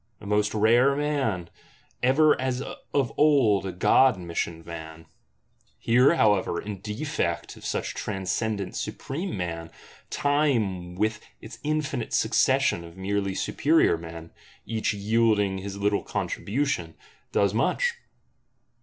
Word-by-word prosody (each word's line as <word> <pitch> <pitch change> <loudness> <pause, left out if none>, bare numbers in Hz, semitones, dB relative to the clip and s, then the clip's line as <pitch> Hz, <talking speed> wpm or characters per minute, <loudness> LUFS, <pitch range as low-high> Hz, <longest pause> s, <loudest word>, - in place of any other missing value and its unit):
A 110 - -12
most 105 +1 +1
rare 120 +6 +4
man; 135 - -1 0.5
ever 145 +5 +5
as 130 0 -1 0.3
of 135 -5 0
old 130 -10 +4
a - - -3
god 110 +6 +4
missioned 85 -1 -4
man! 80 -1 -9 0.7
Here, 125 - +4
however, 105 - +2
in 100 -2 -6
defect 105 - -3
of - - -15
such - - -2
transcendent 100 +1 -3
supreme 165 - -4
man, 85 -2 -4 0.4
Time 115 -12 0
with 110 +3 -1 0.2
its 115 - -11
infinite 150 -6 -2
succession 85 - +2
of 85 +1 -12
merely 100 0 -1
superior 155 - +2
men, 85 0 -9 0.3
each 110 -1 -1
yielding 105 -2 +1
his 100 +1 -6
little 100 0 +1
contribution, 105 - -2 0.4
does 100 -1 +2
much. 475 - +1
105 Hz, 120 wpm, -26 LUFS, 90-130 Hz, 0.7 s, ever